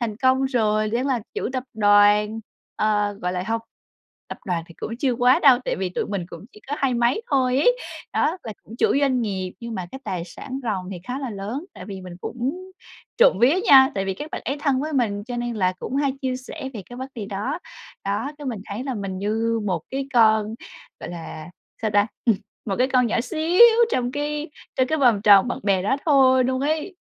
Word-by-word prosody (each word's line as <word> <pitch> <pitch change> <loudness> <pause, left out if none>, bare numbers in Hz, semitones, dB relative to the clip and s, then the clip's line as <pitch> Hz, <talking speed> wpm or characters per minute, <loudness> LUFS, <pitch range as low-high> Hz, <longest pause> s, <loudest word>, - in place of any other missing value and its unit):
thành 220 -3 -2
công 260 +1 +3
rồi, 215 -4 +1
đang 245 +4 0
là 255 -4 0
chủ - - -2
tập 255 -1 -3
đoàn, 210 +1 +4 0.4
ờ, 210 -1 +1
gọi 180 0 -1
là 180 0 -2
hông, 225 0 -1 0.7
tập - - -7
đoàn 170 -3 -1
thì 170 - -15
cũng 230 - -6
chưa 265 -3 +1
quá 250 +2 +4
đâu, 260 -4 +7
tại - - -1
vì 190 -1 -2
tụi - - -2
mình 195 -4 -3
cũng - - -10
chỉ 210 - -16
có 290 - -1
hai 265 -3 +1
mấy 240 - +1
thôi 255 -1 +2
ấy. - - +3 0.3
Đó, 340 +5 +1
là 220 - -6
cũng 225 - -12
chủ - - +2
doanh 260 -3 +2
nghiệp, 190 -4 -3
nhưng 235 -1 -6
mà 185 -2 -4
cái 265 - -6
tài 175 -2 -3
sản 260 +9 -7
ròng 190 -5 -3
thì 180 - -7
khá 250 +2 -4
là 265 -4 -4
lớn. 215 - -5
Tại - - -9
vì 195 -2 -7
mình 180 -1 -9
cũng 285 +11 -4 0.5
trộm - - +5
vía 270 +9 +5
nha, 265 0 +8
tại 195 -1 -1
vì 190 -1 -2
các 300 +9 -7
bạn - - -4
ấy 280 +2 -2
thân 275 -3 +1
với 310 +1 -3
mình 210 -6 0
cho 245 0 -5
nên 240 -1 -3
là 185 -3 +1
cũng 265 - -4
hay 280 -2 +1
chia 255 -1 -1
sẻ 260 +1 -7
về 205 - -6
cái 245 - -8
vấn 260 +1 -6
đề 210 -4 -5
đó. 215 - -3 0.5
Đó, 205 +8 -1
cái 290 - -7
mình 225 -6 -3
thấy 220 +6 -5
là 265 -3 -3
mình 195 -3 -4
như 225 +3 0
một 175 -5 -1
cái 270 +1 -3
con, 220 -1 +4 0.5
gọi - - -6
là 165 -1 -8 0.3
sao 215 - +1
ta? 205 0 +3 0.6
Một 195 - -1
cái 255 +2 +3
con 250 -1 +4
nhỏ 225 +1 0
xíu 320 - -1 0.3
trong 245 0 0
cái 295 +1 -3 0.3
trong 260 0 +3
cái 315 - 0
vòng 235 -7 +3
tròn 205 +2 +7
bạn - - -3
bè 195 -2 +2
đó 265 +7 +1
thôi 260 -4 +5
luôn 260 +1 0
ấy. 315 +6 -2
240 Hz, 230 wpm, -23 LUFS, 205-265 Hz, 0.7 s, nha